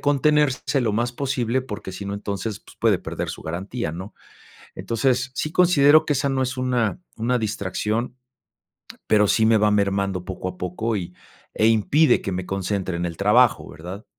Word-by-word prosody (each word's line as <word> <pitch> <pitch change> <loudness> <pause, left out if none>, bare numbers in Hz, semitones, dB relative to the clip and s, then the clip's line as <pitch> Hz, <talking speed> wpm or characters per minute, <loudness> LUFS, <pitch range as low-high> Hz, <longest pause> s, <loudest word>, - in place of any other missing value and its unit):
contenerse 145 -1 +2
lo 110 - 0
más 120 +3 0
posible 130 -2 -1
porque 105 -6 -7
si 95 +2 -7
no, 100 - -3
entonces, 100 +1 -4
pues - - -18
puede - - +3
perder - - -5
su - - -8
garantía, 90 +4 -4
¿no? 95 +5 -8 0.6
Entonces 125 +2 0
sí 155 - -3
considero 155 -4 +5
que 150 - +1
esa 140 +1 0
no 135 -1 0
es 130 0 -2
una, 125 0 0 0.2
una 120 +2 0
distracción, 110 +2 -2 0.9
pero 105 -1 +4
sí 110 +2 +3
me 110 -1 +5
va 105 0 +3
mermando 100 -2 0
poco 95 -1 -5
a 90 - -8
poco 105 +5 -2
y 90 -1 -5 0.4
e 110 - +3
impide 120 +6 +3
que 95 - -3
me 90 0 -4
concentre 95 -2 -2
en 85 0 -2
el 85 - -6
trabajo, 105 +2 +3
¿verdad? 90 +8 -9
110 Hz, 180 wpm, -23 LUFS, 95-130 Hz, 0.9 s, considero